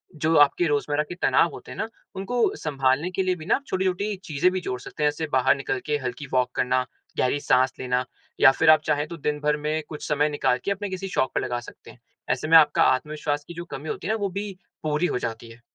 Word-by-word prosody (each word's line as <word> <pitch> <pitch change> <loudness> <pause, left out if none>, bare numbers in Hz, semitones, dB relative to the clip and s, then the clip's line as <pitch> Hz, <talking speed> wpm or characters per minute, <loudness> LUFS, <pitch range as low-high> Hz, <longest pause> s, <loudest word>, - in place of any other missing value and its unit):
जो 160 +1 +1
आपके 145 +4 +5
रोज़मर्रा 145 0 0
के 175 - -5
तनाव 135 +5 +4
होते - - -10
हैं 125 - -8
ना, 220 - -2 0.3
उनको 225 +5 0
सँभालने 135 +2 0
के 190 +1 0
लिए 185 -1 +1
भी 160 -3 -10
ना - - +3
आप 280 - -5
छोटी-छोटी 190 +2 -1
चीज़ें 155 +4 +2
भी 185 - -1
जोड़ 125 -7 -4
सकते 150 - -6
हैं, 150 - +5
जैसे 160 +2 -4
बाहर 130 +1 +4
निकल 135 - -2
के 150 -1 0
हल्की 125 +3 -5
वॉक 125 -1 +2
करना, 130 0 +1 0.3
गहरी 130 +3 +1
साँस 130 -1 +2
लेना 125 0 0 0.3
या 135 - +8
फिर 160 +4 +2
आप 155 -1 +7
चाहें, 150 0 0
तो 170 - -8
दिन 150 0 -2
भर 150 0 +1
में 155 +1 -2
कुछ 150 - -7
समय 150 0 +2
निकाल 145 -4 +1
के 200 - 0
अपने 200 0 -3
किसी 190 +1 -4
शौक 130 -8 0
पे - - +1
लगा 120 0 -2
सकते 120 - -13
हैं। - - -19 0.3
ऐसे 125 +4 0
में 165 +1 +8
आपका 150 -2 +5
आत्मविश्वास 145 +2 0
की 170 - -8
जो 170 +1 -7
कमी 150 +3 -7
होती - - -4
है 215 - +1
ना, - - 0
वो 200 -2 -1
भी 200 +2 -4 0.3
पूरी 155 +2 0
हो 125 - 0
जाती 115 0 -5
है। 115 +1 -15
150 Hz, 250 wpm, -25 LUFS, 130-175 Hz, 0.3 s, या